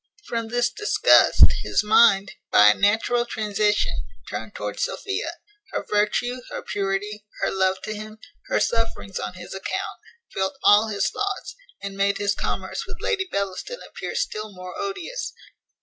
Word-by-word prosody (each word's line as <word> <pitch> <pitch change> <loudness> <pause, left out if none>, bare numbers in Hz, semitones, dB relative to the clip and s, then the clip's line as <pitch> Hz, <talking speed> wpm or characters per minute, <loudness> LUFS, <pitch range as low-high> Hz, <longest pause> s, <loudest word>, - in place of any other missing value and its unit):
From 230 -1 -3
this 245 +1 +1
disgust, 425 +3 +6 0.2
his - - +1
mind, 210 -2 +5 0.2
by 105 0 +8
a - - +6
natural 225 - +2
transition, 210 - 0 0.4
turned 105 +1 -6
towards 105 -1 -3
Sophia; 400 0 -2 0.4
her - - -2
virtue, 210 +4 +1
her - - -6
purity, 205 +1 -2 0.2
her - - +1
love 190 0 +1
to 215 - -3
him, 215 +1 -8 0.3
her - - +1
sufferings 225 - -1
on 105 - -5
his - - -9
account, 190 - -4 0.3
filled 190 +6 -1
all 210 +2 +6
his 200 -2 0
thoughts, 400 -1 -3 0.3
and 200 0 -5
made 200 0 +2
his 205 0 +1
commerce - - -3
with - - -8
Lady 385 -4 -1
Bellaston 200 - -3
appear - - -6
still 215 0 -2
more 180 -1 -9
odious. 400 +6 -4
210 Hz, 150 wpm, -24 LUFS, 195-240 Hz, 0.4 s, by